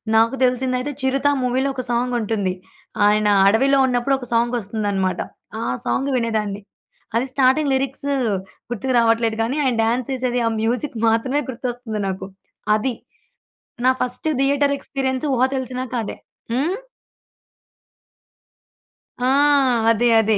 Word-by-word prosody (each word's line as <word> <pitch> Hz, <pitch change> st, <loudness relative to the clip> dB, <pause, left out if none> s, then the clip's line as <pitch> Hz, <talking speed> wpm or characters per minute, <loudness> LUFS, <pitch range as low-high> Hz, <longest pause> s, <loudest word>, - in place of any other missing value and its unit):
నాకు 225 Hz, +4 st, +4 dB
తెలిసిందైతే 255 Hz, +2 st, 0 dB
'చిరుత' 270 Hz, +2 st, +1 dB
మూవీలో 255 Hz, +2 st, +1 dB
ఒక 255 Hz, -, -3 dB
సాంగ్ 245 Hz, +1 st, 0 dB
ఉంటుంది. 205 Hz, -4 st, -1 dB, 0.5 s
ఆయన 210 Hz, 0 st, +3 dB, 0.2 s
అడవిలో 270 Hz, +7 st, +4 dB
ఉన్నప్పుడు 250 Hz, +2 st, +1 dB
ఒక 250 Hz, -, -7 dB
సాంగ్ 235 Hz, +1 st, +2 dB
వస్తుందనమాట. 200 Hz, -3 st, -1 dB, 0.4 s
ఆ -, -, -2 dB, 0.2 s
సాంగ్ 265 Hz, -, 0 dB
వినేదాన్ని. 215 Hz, -3 st, -1 dB, 0.5 s
అది 235 Hz, +3 st, +2 dB
స్టార్టింగ్ 275 Hz, +2 st, +3 dB
లిరిక్స్ 270 Hz, +1 st, -1 dB, 0.6 s
గుర్తుకు 255 Hz, +3 st, -2 dB
రావట్లేదు 230 Hz, -1 st, +2 dB
గానీ, 250 Hz, +6 st, -2 dB
ఆయన 255 Hz, -3 st, +1 dB
డ్యాన్స్ 235 Hz, +2 st, 0 dB
చేసేది 250 Hz, -1 st, -1 dB
ఆ -, -, +2 dB
మ్యూజిక్ 240 Hz, +3 st, -1 dB
మాత్రమే 255 Hz, +6 st, +1 dB
గుర్తొస్తుంది 245 Hz, -3 st, -4 dB
నాకు. 190 Hz, 0 st, -4 dB, 0.5 s
అది. 240 Hz, +4 st, -1 dB, 0.9 s
నా 255 Hz, -, +6 dB
ఫస్ట్ 250 Hz, +4 st, -2 dB
థియేటర్ 280 Hz, +1 st, +2 dB
ఎక్స్‌పీరియన్స్ 265 Hz, 0 st, -2 dB
ఊహ 245 Hz, -, 0 dB
తెలిసినాక 255 Hz, -1 st, -4 dB
అదే. -, -, -5 dB, 0.4 s
హ్మ్. 295 Hz, +10 st, 0 dB, 2.5 s
ఆ! 250 Hz, -, +2 dB, 0.6 s
అదే. 230 Hz, +2 st, +2 dB
అదే. 220 Hz, -1 st, +2 dB
250 Hz, 125 wpm, -21 LUFS, 225-265 Hz, 2.5 s, నా